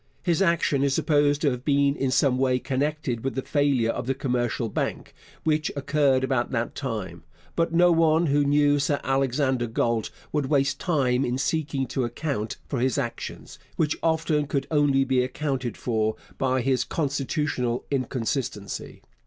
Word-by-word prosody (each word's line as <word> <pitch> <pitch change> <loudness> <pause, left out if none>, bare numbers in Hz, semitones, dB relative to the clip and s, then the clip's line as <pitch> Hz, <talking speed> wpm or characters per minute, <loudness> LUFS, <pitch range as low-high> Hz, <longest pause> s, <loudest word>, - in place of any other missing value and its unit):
His 175 0 +1
action 170 -6 +2
is 140 -1 +2
supposed 145 -1 +2
to 145 - +3
have 125 0 -5
been 140 -1 +2
in 135 -2 -1
some 130 0 +2
way 130 -1 +2
connected 135 -2 -2
with 135 - -2
the 135 - -2
failure 140 -6 +2
of - - -5
the 135 - 0
Commercial 125 -3 -1
Bank, 105 - -3 0.3
which 155 -1 +1
occurred 140 -2 +2
about 130 -2 0
that 120 -2 -2
time, 115 -8 -5 0.3
but 165 0 +1
no 175 +1 +5
one 165 0 +4
who 145 -1 +3
knew 145 0 +3
Sir 140 0 +1
Alexander 135 -1 +1
Galt 115 0 0 0.2
would 150 -3 0
waste 140 0 +1
time 135 -7 +1
in 125 -1 -1
seeking 140 -1 -1
to 130 +1 -2
account 120 -2 -3
for 135 - -2
his 130 +3 +1
actions, 120 -4 -5 0.2
which 150 -2 +1
often 160 -2 +1
could 140 -1 -1
only 145 -3 +3
be 130 -1 +2
accounted 130 -3 -3
for 110 -2 0 0.2
by 130 -1 +1
his 130 0 +1
constitutional 140 -4 -1
inconstancy. 125 -5 -3
135 Hz, 160 wpm, -25 LUFS, 125-145 Hz, 0.3 s, no